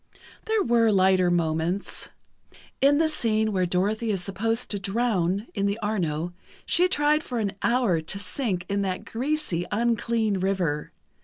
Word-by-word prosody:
There 440 Hz, -1 st, +1 dB
were 235 Hz, -1 st, +3 dB
lighter 185 Hz, -2 st, +4 dB
moments: 170 Hz, +2 st, -1 dB, 0.7 s
In 280 Hz, +1 st, +5 dB
the 320 Hz, +1 st, +3 dB
scene 220 Hz, -7 st, +1 dB
where 185 Hz, -3 st, +1 dB
Dorothy 205 Hz, +6 st, 0 dB
is 195 Hz, -4 st, -1 dB
supposed 225 Hz, +5 st, -1 dB
to 205 Hz, -, 0 dB
drown 200 Hz, -2 st, 0 dB
in 200 Hz, -1 st, 0 dB
the 200 Hz, +1 st, -1 dB
Arno, 175 Hz, -7 st, -2 dB, 0.3 s
she 360 Hz, +2 st, +3 dB
tried 300 Hz, -2 st, +2 dB
for 250 Hz, -, -4 dB
an 210 Hz, -3 st, 0 dB
hour 235 Hz, -9 st, +2 dB
to 160 Hz, +5 st, -6 dB
sink 200 Hz, -3 st, -2 dB
in 200 Hz, 0 st, 0 dB
that 185 Hz, -2 st, -3 dB
greasy, 260 Hz, -, -2 dB
unclean 225 Hz, -2 st, +1 dB
river. 180 Hz, -6 st, -1 dB
205 Hz, 150 wpm, -25 LUFS, 185-235 Hz, 0.7 s, In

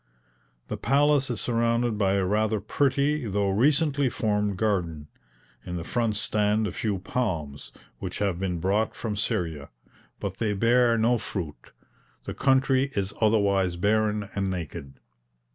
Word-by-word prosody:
The -, -, -4 dB
palace 145 Hz, -1 st, +2 dB
is 120 Hz, -, -2 dB
surrounded 115 Hz, -1 st, +1 dB
by 100 Hz, -2 st, +1 dB
a 100 Hz, -1 st, +1 dB
rather 110 Hz, +2 st, +1 dB
pretty 140 Hz, +3 st, 0 dB
though 100 Hz, -1 st, 0 dB
recently 140 Hz, +4 st, +2 dB
formed 105 Hz, -3 st, -1 dB
garden. 85 Hz, -8 st, -1 dB, 0.5 s
In 90 Hz, -, -5 dB
the 85 Hz, -, -4 dB
front 115 Hz, +3 st, -1 dB
stand 105 Hz, +1 st, +1 dB
a 100 Hz, -, -2 dB
few 105 Hz, 0 st, -2 dB
palms, 85 Hz, -, -3 dB, 0.3 s
which -, -, -5 dB
have 95 Hz, -4 st, -1 dB
been 90 Hz, -3 st, -2 dB
brought 100 Hz, +5 st, 0 dB
from 110 Hz, -3 st, -3 dB
Syria, 85 Hz, -, -2 dB, 0.5 s
but 95 Hz, -1 st, -4 dB
they 110 Hz, -3 st, 0 dB
bear 115 Hz, +3 st, +3 dB
no 115 Hz, +2 st, +2 dB
fruit. 85 Hz, -7 st, -6 dB, 0.5 s
The -, -, -5 dB
country 135 Hz, 0 st, +2 dB
is 100 Hz, 0 st, -1 dB
otherwise 100 Hz, -4 st, +2 dB
barren 105 Hz, +2 st, +1 dB
and 100 Hz, -1 st, -1 dB
naked. 80 Hz, -6 st, -6 dB
105 Hz, 145 wpm, -26 LUFS, 95-120 Hz, 0.5 s, bear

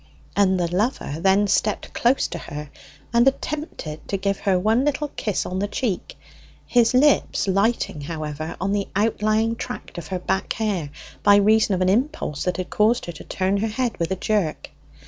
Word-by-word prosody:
And 190 Hz, -2 st, +3 dB
the 175 Hz, 0 st, -1 dB
lover 205 Hz, -, -1 dB
then 195 Hz, +3 st, +4 dB
stepped 210 Hz, +1 st, 0 dB
close 245 Hz, +3 st, +2 dB
to -, -, -5 dB
her, 150 Hz, 0 st, -7 dB, 0.4 s
and 235 Hz, +2 st, +5 dB
attempted 270 Hz, -, -3 dB
to 195 Hz, -, -1 dB
give 195 Hz, 0 st, -1 dB
her 190 Hz, -2 st, +2 dB
one 220 Hz, +7 st, +2 dB
little 295 Hz, +1 st, 0 dB
kiss 210 Hz, -7 st, -2 dB
on 185 Hz, +1 st, -3 dB
the 205 Hz, -, 0 dB
cheek, 210 Hz, -2 st, -3 dB, 0.5 s
his 240 Hz, -1 st, +3 dB
lips 280 Hz, -5 st, +3 dB
alighting, 195 Hz, -4 st, +1 dB
however, 155 Hz, 0 st, -5 dB
on 195 Hz, +2 st, 0 dB
an 200 Hz, -1 st, 0 dB
outlying 215 Hz, +2 st, +1 dB
tract 190 Hz, -, -6 dB
of 160 Hz, -, -9 dB
her 185 Hz, -, -2 dB
back 190 Hz, +1 st, -1 dB
hair 200 Hz, -9 st, -2 dB, 0.3 s
by 205 Hz, 0 st, +6 dB
reason 210 Hz, 0 st, +4 dB
of 185 Hz, -, -2 dB
an 185 Hz, -, +3 dB
impulse 235 Hz, -, 0 dB
that 180 Hz, -, 0 dB
had 185 Hz, -1 st, -5 dB
caused 225 Hz, +3 st, +2 dB
her 175 Hz, -, -5 dB
to 165 Hz, -, -11 dB
turn 190 Hz, +1 st, 0 dB
her 215 Hz, +3 st, 0 dB
head 235 Hz, +2 st, -1 dB
with 170 Hz, -, 0 dB
a 190 Hz, -, 0 dB
jerk. 190 Hz, -4 st, -1 dB
200 Hz, 185 wpm, -23 LUFS, 180-225 Hz, 0.5 s, by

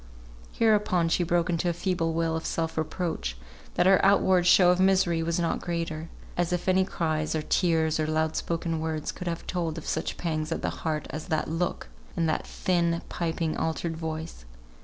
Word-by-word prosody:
Hereupon 210 Hz, -6 st, +2 dB
she 170 Hz, -, +2 dB
broke 170 Hz, 0 st, +1 dB
into 175 Hz, 0 st, 0 dB
a -, -, 0 dB
feeble 175 Hz, -2 st, -1 dB
wail 165 Hz, 0 st, 0 dB
of 160 Hz, -, -3 dB
self 165 Hz, -1 st, -2 dB
reproach, 160 Hz, -, -2 dB, 0.4 s
that 175 Hz, -, +3 dB
her 190 Hz, 0 st, +5 dB
outward 190 Hz, -2 st, +4 dB
show 180 Hz, 0 st, +7 dB
of 180 Hz, -, +1 dB
misery 185 Hz, -3 st, +3 dB
was 170 Hz, +1 st, 0 dB
not 170 Hz, -1 st, 0 dB
greater; 165 Hz, -2 st, -3 dB, 0.3 s
as 175 Hz, 0 st, 0 dB
if 180 Hz, +1 st, -2 dB
any 185 Hz, 0 st, +4 dB
cries, 155 Hz, -3 st, -1 dB
or 155 Hz, -, -1 dB
tears, 160 Hz, -2 st, +2 dB
or 155 Hz, -, 0 dB
loud 160 Hz, 0 st, 0 dB
spoken 165 Hz, -1 st, -2 dB
words 160 Hz, -1 st, -2 dB
could 180 Hz, -, -7 dB
have 170 Hz, -1 st, -3 dB
told 170 Hz, -3 st, -2 dB
of 160 Hz, -, -7 dB
such -, -, -2 dB
pangs 155 Hz, -2 st, -2 dB
at -, -, -2 dB
the -, -, 0 dB
heart 155 Hz, -2 st, -1 dB
as 155 Hz, 0 st, -6 dB
that 155 Hz, -, 0 dB
look, 165 Hz, +2 st, -2 dB, 0.3 s
and 165 Hz, -, +2 dB
that 155 Hz, -, -1 dB
thin, 170 Hz, -2 st, 0 dB
piping, 165 Hz, -2 st, -2 dB
altered 160 Hz, +1 st, -2 dB
voice! 160 Hz, -, -5 dB
165 Hz, 190 wpm, -27 LUFS, 160-175 Hz, 0.4 s, show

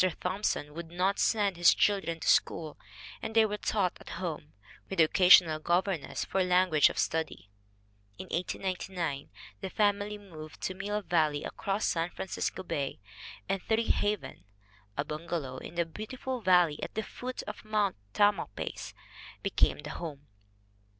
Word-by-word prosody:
Thompson 180 Hz, -5 st, -1 dB
would 165 Hz, +1 st, -7 dB
not 185 Hz, +3 st, 0 dB
send 205 Hz, -4 st, +2 dB
his 175 Hz, 0 st, +6 dB
children 195 Hz, -5 st, +1 dB
to -, -, -4 dB
school 155 Hz, -3 st, +2 dB, 0.5 s
and 225 Hz, 0 st, -5 dB
they 225 Hz, -1 st, +7 dB
were 210 Hz, -1 st, -2 dB
taught 195 Hz, -4 st, 0 dB
at -, -, -11 dB
home, 160 Hz, -5 st, -5 dB, 0.4 s
with 195 Hz, -, -4 dB
an 160 Hz, -, +8 dB
occasional 175 Hz, -2 st, +6 dB
governess 175 Hz, 0 st, 0 dB
for 190 Hz, 0 st, +1 dB
language 180 Hz, -4 st, +4 dB
study. 160 Hz, -10 st, -2 dB, 0.7 s
In -, -, -7 dB
1899 180 Hz, -4 st, -3 dB, 0.3 s
the 190 Hz, -, -3 dB
family 205 Hz, 0 st, +1 dB
moved 160 Hz, -7 st, -11 dB
to 185 Hz, -, -2 dB
Mill 205 Hz, +2 st, -3 dB
Valley 155 Hz, -5 st, +1 dB
across 200 Hz, +2 st, -2 dB
San 165 Hz, 0 st, 0 dB
Francisco 190 Hz, +1 st, -3 dB
Bay, 140 Hz, -6 st, -3 dB, 0.5 s
and 195 Hz, -, -1 dB
"Treehaven," 210 Hz, -, 0 dB, 0.5 s
a 145 Hz, -, 0 dB
bungalow 155 Hz, -4 st, -4 dB
in 160 Hz, -, -9 dB
the 170 Hz, 0 st, +1 dB
beautiful 245 Hz, +8 st, -5 dB
valley 180 Hz, -6 st, +4 dB
at -, -, -5 dB
the 220 Hz, -, -1 dB
foot 255 Hz, +3 st, -6 dB
of 210 Hz, -, -7 dB
Mount 210 Hz, -2 st, +1 dB, 0.2 s
Tamalpais, 205 Hz, 0 st, 0 dB, 0.5 s
be -, -, -1 dB
came -, -, +2 dB
the -, -, -6 dB
home. 145 Hz, -4 st, -7 dB
180 Hz, 145 wpm, -30 LUFS, 160-205 Hz, 0.7 s, an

